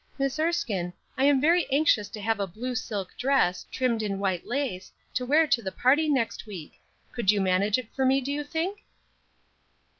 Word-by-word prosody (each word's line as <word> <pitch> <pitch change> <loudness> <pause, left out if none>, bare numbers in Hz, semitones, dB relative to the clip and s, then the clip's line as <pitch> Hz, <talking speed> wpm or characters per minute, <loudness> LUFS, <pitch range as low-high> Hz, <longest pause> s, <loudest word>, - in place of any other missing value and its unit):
Miss 275 +1 -1
Erskine, 225 - -1 0.2
I 265 - +2
am 285 -1 +5
very 335 +5 +3
anxious 270 -7 +3
to 215 - -8
have 220 0 0
a 200 - -1
blue 240 +8 -5
silk 210 -6 -4
dress, 255 -9 +1
trimmed 245 -3 0
in 200 -2 -2
white 190 -3 -2
lace, 245 -8 -3 0.2
to 250 -1 -2
wear 310 +4 +5
to 245 -5 +2
the 190 -3 -4
party 290 +8 +3
next 255 -5 -1
week; 185 -7 -8 0.4
could 235 -6 -2
you 205 0 +5
manage 195 +3 +2
it 250 -3 -7
for 265 - 0
me, 265 +1 +4
do 275 +1 -4
you 295 +1 -2
think?" 335 +7 -3
250 Hz, 190 wpm, -27 LUFS, 200-280 Hz, 0.4 s, am